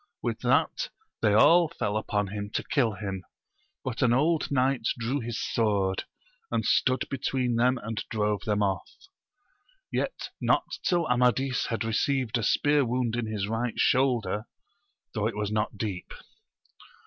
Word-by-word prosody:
With - - -2
that - - +1 0.3
they 105 -2 +3
all 170 +9 +6
fell 105 -10 -3
upon 105 -2 -1
him 100 0 -5
to - - 0
kill 125 -8 +1
him, 95 -3 -5 0.6
but 125 -3 -4
an 120 -3 +4
old 155 +5 +2
knight 130 -3 +1
drew 120 +5 -1
his 120 -3 -4
sword, 100 -4 0 0.4
and - - -1
stood 130 0 +2
between 125 -3 0
and 115 -3 0
drove 105 -2 0
them 105 -1 +1
off; 95 -2 -1 1.0
yet - - -2
not - - +3 0.2
till 175 -2 +1
Amadis 125 +1 +2
had 115 0 -2
received 120 +1 0
a - - -3
spear 145 +7 +3
wound 120 -1 0
in 120 -2 -2
his 105 -2 -2
right 115 +2 -2
shoulder, 120 -6 +2 0.7
though 110 -1 0
it 110 -2 -4
was 105 -1 -2
not 105 0 -1
deep. 100 -4 -4
115 Hz, 150 wpm, -28 LUFS, 105-130 Hz, 1.0 s, all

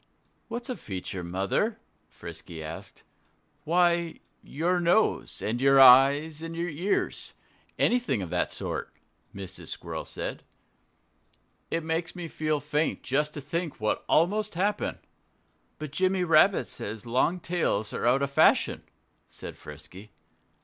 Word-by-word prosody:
"What's 240 +1 -5
a 255 - -3
feature, 95 - -6
Mother?" 95 - -1 0.3
Frisky 85 -1 -9
asked. 80 +2 -9 0.6
"Why 170 0 +2 0.2
your 175 +5 0
nose, 175 +5 +1
and 120 +3 -1
your 135 0 +6
eyes, 140 +4 +7
and 165 0 -6
your 170 +1 -2
ears 175 +6 -2 0.4
anything 170 - +1
of 85 - -7
that - - 0
sort," - - -4 0.4
Mrs. 95 -2 -7
Squirrel - - -6
said. - - -5 1.3
"It 165 0 -1
makes 165 +2 -2
me 175 -2 -5
feel 155 -1 -1
faint 150 +2 -1
just 150 +3 0
to 145 - -5
think 165 +3 -4
what 110 0 -1
almost 205 +5 +2
happened." 200 +4 0 0.8
"But 155 -2 -6
Jimmy 185 +3 +1
Rabbit 170 +3 +4
says 105 +1 -6
long 130 +9 +1
tails 165 - -1
are - - -1
out 135 +3 +3
of 140 - -1
fashion," - - +4 0.5
said - - -9
Frisky. 80 +8 -12
150 Hz, 130 wpm, -28 LUFS, 115-175 Hz, 1.3 s, eyes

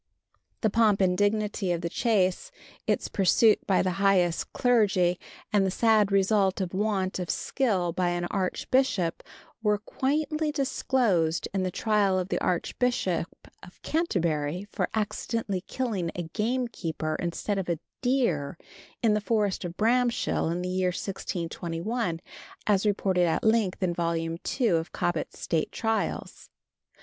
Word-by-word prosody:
The 220 - +2
pomp 220 -3 +3
and 185 -2 +3
dignity 205 -1 0
of 170 -1 -1
the 170 - -2
chase, 210 - +1 0.4
its - - +1
pursuit 210 +3 +4
by 190 - +3
the 185 - 0
highest 185 -4 +2
clergy 195 -8 +2 0.3
and 205 -2 +4
the 190 - +1
sad 215 0 +3
result 195 0 +2
of 185 -2 -3
want 195 -2 0
of 180 - -4
skill 190 -11 0
by 180 0 +1
an 175 0 -1
archbishop 195 -1 0 0.4
are 210 -1 +3
quaintly 300 +7 -1
disclosed 240 - +1
in 195 - 0
the 185 - 0
trial 200 0 +1
of 185 0 -2
the - - 0
Archbishop 185 -1 0 0.3
of 180 - -15
Canterbury 175 - -1
for - - -1
accidentally 215 -2 -2
killing 215 -10 -2
a 175 - -3
game 230 +9 -1
keeper 160 -7 -3
instead 185 +4 -2
of 185 - -4
a 170 - +1 0.2
deer 210 - 0 0.5
in 220 -2 +4
the 210 - +1
forest 210 -2 0
of 175 0 -6
Bramshill 240 -5 +1
in 175 +1 -2
the 180 - -2
year 185 0 +1
1621, 175 +1 -3 0.4
as 205 0 +2
reported 190 -3 +2
at 165 - 0
length 220 -4 +2
in 175 -2 +1
Vol. 170 -1 0
II. 165 +9 -1
of 165 -2 0
Cobbett's 175 -3 -2
State 160 -2 -1
Trials. 225 -1 -2
195 Hz, 145 wpm, -27 LUFS, 175-220 Hz, 0.5 s, pursuit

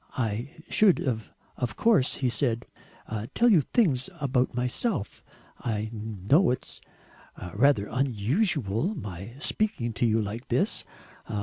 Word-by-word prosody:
"I 115 +1 -1 0.2
should 205 -5 +4
of 115 -1 -4
course," 215 - +3
he 130 - 0
said, 120 -2 0 0.7
"tell 240 +1 +5
you 185 -8 +6
things 150 - +1
about 130 -4 +1
myself. 125 - -1 0.4
I 110 -2 -2
know 110 - +2
it 125 - -1
is - - -10 0.7
rather 140 -8 +4
unusual 135 - 0
my 100 - -7
speaking 155 - -1
to 120 +1 +1
you 110 0 +3
like 110 +3 -4
this. - - +1
125 Hz, 120 wpm, -27 LUFS, 110-150 Hz, 0.7 s, you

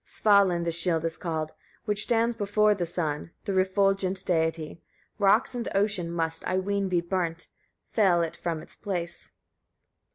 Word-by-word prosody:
38. 200 -2 +4
Svalin 170 -1 -1
the 170 - -1
shield 165 -1 +1
is 165 -1 -1
called, 160 -2 -3 0.3
which 210 -2 0
stands 230 0 +2
before 210 0 +2
the 180 -4 -3
sun, 160 -3 -3 0.2
the 200 - -1
refulgent 190 0 +1
deity; 160 -2 -1 0.4
rocks 205 +5 +4
and 240 -1 -3
ocean 195 -4 +1
must, 165 -1 -2
I 185 - 0
ween, 200 +1 -1
be 175 -2 +2
burnt, 170 -1 -2 0.5
fell 185 -6 +3
it 165 - -4
from 165 -3 -3
its - - -13
place. 175 -4 -5
185 Hz, 160 wpm, -27 LUFS, 165-200 Hz, 0.5 s, 38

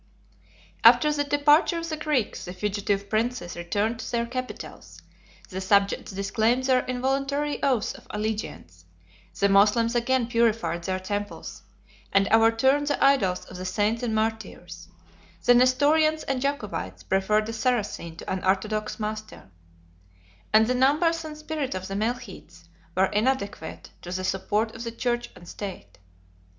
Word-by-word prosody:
After 300 -1 +7
the 290 -1 0
departure 295 +4 +3
of 335 0 -4
the 315 - -3
Greeks, 300 -7 -1
the 180 - -6
fugitive 200 0 -2
princes 215 -4 -2
returned 205 +7 -1
to - - -6
their 235 -1 0
capitals; 255 +1 -7 0.5
the 190 0 -5
subjects 200 +2 +2
disclaimed 220 +6 0
their 260 -1 +3
involuntary 275 +3 -1
oaths 255 -6 +1
of - - -15
allegiance; 210 - -5 0.5
the 200 - +4
Moslems 210 +4 +4
again 245 +1 +1
purified 230 -7 0
their 185 0 -1
temples, 205 +2 -5 0.5
and 195 0 +3
overturned 230 +6 +4
the 290 - 0
idols 215 -10 +3
of 185 - -10
the 185 - -6
saints 210 +5 0
and 230 -3 -1
martyrs; 215 -6 -4 0.6
the 245 - +7
Nestorians 290 +5 +3
and 270 -2 -2
Jacobites 280 +2 -3
preferred 210 +3 +1
a - - -4
Saracen 220 -8 -1
to - - -11
an 190 -1 -3
orthodox 215 +4 -1
master; 215 - -6 1.0
and 215 +1 +6
the 250 - +1
numbers 310 +6 +2
and 305 -1 -8
spirit 305 -6 -4
of 185 0 -5
the 195 - -5
Melchites 200 -6 -5 0.3
were 190 - +5
inadequate 210 -5 -2
to 175 - -8
the 185 0 -3
support 205 +4 -1
of 225 - -7
the 230 - -4
church 240 0 -2
and 175 - -14
state. 180 - -8
225 Hz, 145 wpm, -26 LUFS, 195-260 Hz, 1.0 s, After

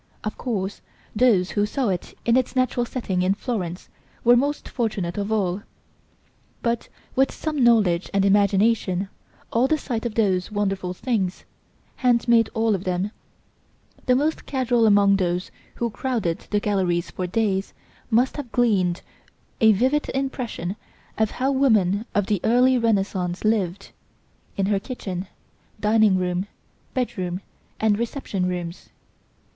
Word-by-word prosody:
Of 215 - -3
course 200 -5 -3 0.3
those 210 -6 +3
who 205 0 +1
saw 255 0 -1
it 180 -2 -4
in 235 - +4
its 255 0 +1
natural 255 -1 +1
setting 195 -8 -2
in 185 +2 +2
Florence, 195 -7 -4 0.4
were 240 +1 +7
most 285 +4 0
fortunate 205 -8 -2
of 205 +1 -3
all. 195 -3 0 1.0
But 235 -1 -1 0.3
with 265 0 +3
some 305 -4 -2
knowledge 205 -7 +3
and 195 0 +2
imagination, 200 -1 +2 0.5
at 250 +3 +3
the 315 - +3
sight 240 -6 -3
of 220 - -8
those 190 -5 +1
wonderful 195 -3 -1
things, 195 -6 -1 0.5
hand 245 -2 +2
made 230 -2 +4
all 225 -1 +2
of 190 -2 -2
them, 185 +2 -1 1.0
the 250 - +5
most 300 +4 0
casual 245 -4 +2
among 200 -1 +5
those 180 -1 -1 0.2
who 235 -1 -2
crowded 215 -9 -2
the 210 - +2
galleries 185 -4 0
for 185 - -3
days, 195 0 0 0.4
must 245 +5 +2
have 270 -6 -6
gleaned 195 -8 +2 0.6
a 220 -3 +6
vivid 260 +8 +1
impression 245 -8 -3 0.4
of 220 -1 +3
how 265 +4 -1
woman 220 -7 +2
of 205 -1 +2
the 205 -4 0
Early 250 +3 +4
Renaissance 195 -5 0
lived, 200 -3 0 0.7
in 195 - +1
her 200 0 +1
kitchen, 195 -6 -5 0.5
dining 210 -2 +4
room, 180 +1 -1 0.5
bedroom 195 -8 -2 0.4
and 215 -1 +2
reception 230 -6 -2
rooms. 175 -1 -5
210 Hz, 140 wpm, -23 LUFS, 190-240 Hz, 1.0 s, were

